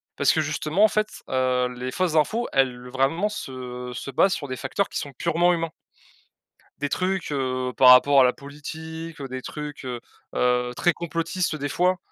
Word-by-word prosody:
parce 140 Hz, -3 st, +4 dB
que, 160 Hz, -, +2 dB
justement, 155 Hz, +5 st, 0 dB
en -, -, +6 dB
fait, 215 Hz, 0 st, 0 dB, 0.2 s
heu, 130 Hz, -1 st, +1 dB
les 130 Hz, +1 st, -4 dB
fausses 180 Hz, -1 st, 0 dB
infos, 225 Hz, +10 st, +2 dB
elles, 125 Hz, -2 st, +1 dB
vraiment, 140 Hz, +10 st, +1 dB
se 125 Hz, -8 st, -6 dB
se 135 Hz, -, -6 dB
basent 190 Hz, +8 st, +3 dB
sur 145 Hz, -, -4 dB
des 130 Hz, -, -4 dB
facteurs 200 Hz, -, -1 dB
qui -, -, -4 dB
sont 140 Hz, -2 st, -6 dB
purement 170 Hz, +5 st, +2 dB
humains 165 Hz, -1 st, -1 dB, 1.1 s
des 145 Hz, -, -1 dB
trucs, 185 Hz, -3 st, -1 dB
heu, 130 Hz, -2 st, -1 dB
par 130 Hz, -1 st, +7 dB
rapport 135 Hz, +2 st, +8 dB
à -, -, +7 dB
la 125 Hz, -, +5 dB
politique, 160 Hz, +3 st, -8 dB
heu, 135 Hz, -, -5 dB
des 130 Hz, 0 st, -6 dB
trucs, 150 Hz, 0 st, -7 dB
heu 125 Hz, -2 st, -4 dB, 0.3 s
heu, 125 Hz, 0 st, +1 dB
très 175 Hz, -, +3 dB
complotistes, 165 Hz, 0 st, -2 dB
des 145 Hz, 0 st, -3 dB
fois, 180 Hz, +5 st, +2 dB
145 Hz, 190 wpm, -24 LUFS, 130-170 Hz, 1.1 s, rapport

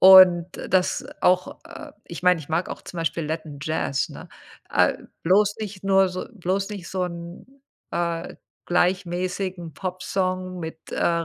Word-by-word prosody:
und 185 Hz, -2 st, +9 dB, 0.2 s
das 185 Hz, 0 st, +2 dB
auch 180 Hz, 0 st, +2 dB
äh, 315 Hz, -3 st, -10 dB
ich 170 Hz, +1 st, -8 dB
meine, 180 Hz, -2 st, +5 dB
ich 145 Hz, -, -11 dB
mag 165 Hz, +3 st, 0 dB
auch -, -, -6 dB
zum 175 Hz, -, -8 dB
Beispiel 165 Hz, 0 st, -1 dB
Latin 155 Hz, -2 st, -4 dB
Jazz, 155 Hz, -3 st, 0 dB
ne? -, -, -10 dB, 0.4 s
Äh, -, -, +4 dB, 0.3 s
bloß 200 Hz, +4 st, +4 dB
nicht 200 Hz, -2 st, -6 dB
nur 195 Hz, -1 st, +5 dB
so 185 Hz, 0 st, -5 dB
bloß 195 Hz, 0 st, -1 dB
nicht 195 Hz, -5 st, -6 dB
so 185 Hz, -1 st, -1 dB
'n, 170 Hz, +2 st, -7 dB, 0.5 s
äh, 170 Hz, -1 st, -2 dB, 0.3 s
gleichmäßigen 180 Hz, -1 st, 0 dB
Popsong 185 Hz, 0 st, -2 dB
mit, 160 Hz, 0 st, -6 dB
äh, 170 Hz, -1 st, +1 dB
180 Hz, 150 wpm, -24 LUFS, 170-190 Hz, 0.5 s, und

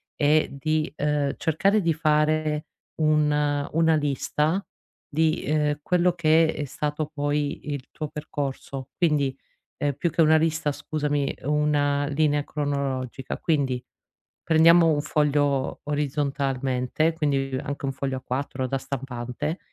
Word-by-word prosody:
è 150 Hz, +1 st, +3 dB
di, 155 Hz, +3 st, -1 dB
ehm, 150 Hz, -1 st, 0 dB
cercare 195 Hz, +7 st, +2 dB
di 165 Hz, -2 st, +2 dB
fare 155 Hz, 0 st, +1 dB, 0.3 s
un 150 Hz, -2 st, +2 dB
una 160 Hz, 0 st, +4 dB
lista 150 Hz, +5 st, 0 dB, 0.5 s
di, 160 Hz, +1 st, +1 dB
ehm, 150 Hz, -1 st, 0 dB
quello 180 Hz, +1 st, +2 dB
che 160 Hz, -1 st, +3 dB
è 145 Hz, -, -3 dB
stato 150 Hz, +3 st, -3 dB
poi 145 Hz, 0 st, -2 dB
il 135 Hz, -2 st, -6 dB
tuo 155 Hz, -, -5 dB
percorso. 140 Hz, -3 st, -5 dB
Quindi, 150 Hz, -6 st, +2 dB, 0.4 s
ehm, 145 Hz, -1 st, 0 dB
più 170 Hz, +5 st, -1 dB
che 165 Hz, -, +2 dB
una 160 Hz, 0 st, +6 dB
lista 160 Hz, -2 st, +1 dB
scusami, 145 Hz, -2 st, -2 dB
una 145 Hz, -1 st, +1 dB
linea 145 Hz, 0 st, +1 dB
cronologica. 140 Hz, -4 st, -3 dB
Quindi, 135 Hz, -6 st, 0 dB, 0.6 s
prendiamo 165 Hz, +1 st, +6 dB
un 145 Hz, -, 0 dB
foglio 145 Hz, -3 st, +1 dB
orizzontalmente, 140 Hz, 0 st, 0 dB
quindi 135 Hz, -4 st, 0 dB
anche 145 Hz, -1 st, -4 dB
un 135 Hz, -, -2 dB
foglio 135 Hz, -1 st, -3 dB
A4 130 Hz, 0 st, -3 dB
da 135 Hz, -, -1 dB
stampante, 135 Hz, +3 st, -4 dB
150 Hz, 125 wpm, -25 LUFS, 140-155 Hz, 0.6 s, una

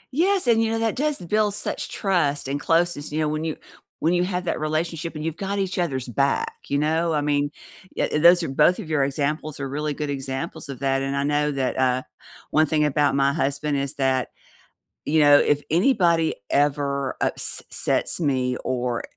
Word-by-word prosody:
Yes, 375 Hz, +1 st, +2 dB
and, 230 Hz, -2 st, +4 dB
you 220 Hz, -, 0 dB
know, 225 Hz, -, 0 dB
that 225 Hz, -1 st, 0 dB
does 300 Hz, +1 st, 0 dB
build 205 Hz, +3 st, 0 dB
such -, -, -4 dB
trust 155 Hz, -9 st, 0 dB
and 140 Hz, +1 st, -2 dB
closeness, 165 Hz, -3 st, 0 dB
you 155 Hz, -, -2 dB
know, 155 Hz, -, +1 dB
when 155 Hz, +1 st, -2 dB
you 160 Hz, -2 st, -3 dB, 0.4 s
when 165 Hz, +3 st, +2 dB
you 175 Hz, 0 st, +2 dB
have 180 Hz, -1 st, -2 dB
that 165 Hz, -, -2 dB
relationship 160 Hz, +1 st, -2 dB
and 155 Hz, -, -5 dB
you've 165 Hz, -1 st, -3 dB
got 200 Hz, +2 st, -3 dB
each 190 Hz, -1 st, -2 dB
other's 130 Hz, -7 st, -1 dB
back, 135 Hz, +4 st, 0 dB
you 140 Hz, -, 0 dB
know? 160 Hz, +2 st, +1 dB
I 150 Hz, -, +1 dB
mean, 145 Hz, 0 st, +1 dB, 0.5 s
ye -, -, +1 dB
those 175 Hz, +3 st, +6 dB
are -, -, -2 dB
both 175 Hz, +6 st, +3 dB
of 160 Hz, -, -7 dB
your 150 Hz, -3 st, +2 dB
examples 145 Hz, +2 st, -2 dB
are 135 Hz, -, -2 dB
really 150 Hz, +2 st, -2 dB
good 150 Hz, 0 st, -3 dB
examples 135 Hz, -1 st, -5 dB
of 135 Hz, -3 st, -6 dB
that 135 Hz, -1 st, +1 dB
and 135 Hz, 0 st, -2 dB
I 140 Hz, -, 0 dB
know 150 Hz, +1 st, +1 dB
that, 135 Hz, -2 st, -1 dB
uh, 130 Hz, 0 st, +1 dB, 0.5 s
one 155 Hz, -, +4 dB
thing 150 Hz, 0 st, +1 dB
about 145 Hz, 0 st, +2 dB
my 140 Hz, 0 st, +3 dB
husband 140 Hz, 0 st, -1 dB
is 140 Hz, 0 st, -2 dB
that, 130 Hz, -2 st, 0 dB, 0.8 s
you 155 Hz, +2 st, +1 dB
know, 145 Hz, -1 st, +7 dB
if 145 Hz, 0 st, +2 dB
anybody 170 Hz, -, +3 dB
ever 140 Hz, -2 st, 0 dB
ups -, -, -2 dB
sets -, -, -1 dB
me 130 Hz, -5 st, 0 dB
or 125 Hz, -2 st, -1 dB
150 Hz, 200 wpm, -23 LUFS, 140-170 Hz, 0.8 s, know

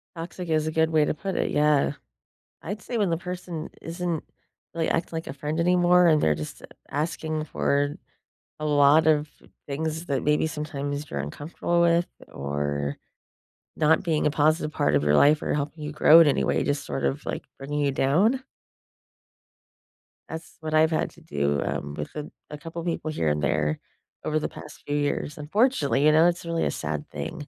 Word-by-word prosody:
Toxic 170 Hz, +1 st, -6 dB
is 155 Hz, -1 st, +1 dB
a -, -, -1 dB
good 160 Hz, 0 st, +2 dB
way 155 Hz, -2 st, +3 dB
to -, -, 0 dB
put 190 Hz, +5 st, -4 dB
it, -, -, 0 dB
yeah. 150 Hz, -1 st, +3 dB, 0.7 s
I'd 205 Hz, +5 st, -5 dB
say 240 Hz, -, -3 dB
when 200 Hz, -4 st, +2 dB
the 165 Hz, -, +1 dB
person 175 Hz, -2 st, -6 dB
isn't 170 Hz, -1 st, -3 dB, 0.5 s
really 165 Hz, -1 st, -1 dB
acting 165 Hz, 0 st, -1 dB
like 160 Hz, -, -4 dB
a -, -, -5 dB
friend 150 Hz, +4 st, -3 dB
anymore 180 Hz, 0 st, +4 dB
and 155 Hz, -2 st, +5 dB
they're 75 Hz, -, +3 dB
just 75 Hz, 0 st, -7 dB, 0.3 s
asking 155 Hz, +1 st, -2 dB
for 145 Hz, -1 st, 0 dB, 0.6 s
a 155 Hz, -, -3 dB
lot 145 Hz, +1 st, +5 dB
of 150 Hz, -1 st, +3 dB, 0.4 s
things 160 Hz, +3 st, -3 dB
that 140 Hz, -5 st, -1 dB
maybe 150 Hz, +1 st, +2 dB
sometimes 145 Hz, -1 st, -4 dB
you're 70 Hz, -, -4 dB
uncomfortable 150 Hz, -, -2 dB
with 170 Hz, 0 st, +3 dB, 0.2 s
or 70 Hz, 0 st, -3 dB, 0.8 s
not 160 Hz, 0 st, +3 dB
being 160 Hz, -4 st, 0 dB
a -, -, +4 dB
positive 155 Hz, +1 st, +1 dB
part 75 Hz, -, +1 dB
of 70 Hz, 0 st, +2 dB
your 75 Hz, 0 st, +4 dB
life 150 Hz, -, +5 dB
or -, -, -1 dB
helping 150 Hz, +1 st, -3 dB
you 150 Hz, -, -4 dB
grow 155 Hz, +2 st, +7 dB
in 165 Hz, -, +7 dB
any 145 Hz, -, +2 dB
way, -, -, +1 dB
just 145 Hz, 0 st, -1 dB
sort 135 Hz, -, -3 dB
of, 140 Hz, +2 st, -1 dB
like, -, -, -4 dB
bringing 145 Hz, +2 st, -3 dB
you 140 Hz, -1 st, +1 dB
down. 190 Hz, -, +2 dB, 1.9 s
That's 160 Hz, 0 st, -8 dB
what 155 Hz, -1 st, -5 dB
I've 155 Hz, +1 st, +4 dB
had 160 Hz, -, 0 dB
to -, -, -18 dB
do, 70 Hz, 0 st, -1 dB
um, 70 Hz, 0 st, -3 dB
with 75 Hz, 0 st, -6 dB
a 150 Hz, 0 st, -5 dB, 0.2 s
a 150 Hz, -, -7 dB
couple 165 Hz, +2 st, -7 dB
people 165 Hz, -2 st, -2 dB
here 80 Hz, -, 0 dB
and 75 Hz, 0 st, 0 dB
there 75 Hz, +1 st, 0 dB, 0.5 s
over 155 Hz, 0 st, +1 dB
the -, -, -3 dB
past 150 Hz, -, -12 dB
few 145 Hz, -, -2 dB
years, 145 Hz, 0 st, -1 dB
unfortunately, 150 Hz, -, +2 dB
you 155 Hz, -, +7 dB
know, 160 Hz, +2 st, +6 dB
it's 175 Hz, 0 st, -1 dB
really 165 Hz, 0 st, -1 dB
a -, -, 0 dB
sad 75 Hz, -1 st, -4 dB
thing. 75 Hz, -, -6 dB
150 Hz, 190 wpm, -25 LUFS, 140-165 Hz, 1.9 s, grow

